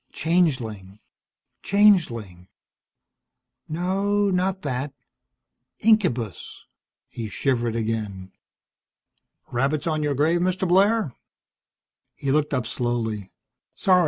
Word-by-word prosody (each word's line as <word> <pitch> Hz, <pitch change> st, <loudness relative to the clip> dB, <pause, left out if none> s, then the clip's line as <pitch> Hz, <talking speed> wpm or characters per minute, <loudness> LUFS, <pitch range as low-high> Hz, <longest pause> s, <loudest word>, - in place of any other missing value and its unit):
Changeling, 125 Hz, -, 0 dB, 0.6 s
changeling 120 Hz, -, +2 dB, 1.2 s
No, 195 Hz, +5 st, +1 dB
not 185 Hz, +1 st, 0 dB
that. 135 Hz, +1 st, -3 dB, 0.8 s
Incubus! 170 Hz, -, 0 dB, 0.4 s
He 115 Hz, -2 st, -6 dB
shivered 120 Hz, -2 st, 0 dB
again. 110 Hz, -4 st, -3 dB, 1.2 s
"Rabbits 135 Hz, +5 st, 0 dB
on 155 Hz, -2 st, 0 dB
your 145 Hz, -1 st, 0 dB
grave, 160 Hz, +5 st, +2 dB
Mr. 185 Hz, +1 st, 0 dB
Blair?" 195 Hz, -, +3 dB, 1.0 s
He 135 Hz, -, -2 dB
looked 150 Hz, +1 st, +1 dB
up 130 Hz, -5 st, 0 dB
slowly. 115 Hz, -5 st, -2 dB, 0.5 s
"Sorry. 185 Hz, -1 st, +4 dB
145 Hz, 85 wpm, -24 LUFS, 115-185 Hz, 1.2 s, Sorry